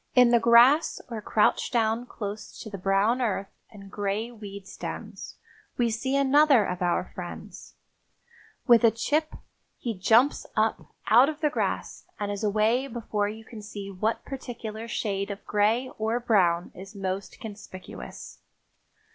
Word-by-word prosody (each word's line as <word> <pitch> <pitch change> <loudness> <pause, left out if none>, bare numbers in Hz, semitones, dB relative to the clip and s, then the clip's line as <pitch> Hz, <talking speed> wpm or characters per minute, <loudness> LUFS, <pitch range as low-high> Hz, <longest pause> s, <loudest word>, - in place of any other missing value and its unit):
In 250 -2 +6
the 235 - +5
grass 235 +6 +5
or 225 -2 -4
crouched 210 +1 +1
down 230 0 +1
close 210 -2 -7
to 215 - -8
the 200 - -6
brown 200 +6 +2
earth 200 -4 -1 0.2
and 195 -2 -13
gray 205 +3 -2
weed 200 -4 -10
stems - - -7 0.4
we 235 -2 +2
see 260 +5 -1
another 275 -3 +5
of 180 -1 -4
our 175 -1 0
friends. - - -9 0.9
With 240 -3 +6
a 230 - +8
"chip" 300 +8 -1 0.4
he 235 - -3
jumps 225 +9 +3
up 220 0 -1
out 245 +6 +7
of 310 0 -6
the 300 -2 +2
grass - - -3
and 205 -1 -2
is 205 +1 -4
away 215 +5 +2
before 215 -4 -2
you 220 +1 -9
can 220 -2 -10
see 205 -1 -7
what 215 +4 -2
particular 230 -4 -6
shade 200 -3 -2
of 200 0 -7
gray 220 +5 +1
or 220 +2 0
brown 185 -8 +2
is 195 +3 -11
most 195 0 -4
conspicuous. 200 -3 -10
220 Hz, 150 wpm, -27 LUFS, 200-240 Hz, 0.9 s, a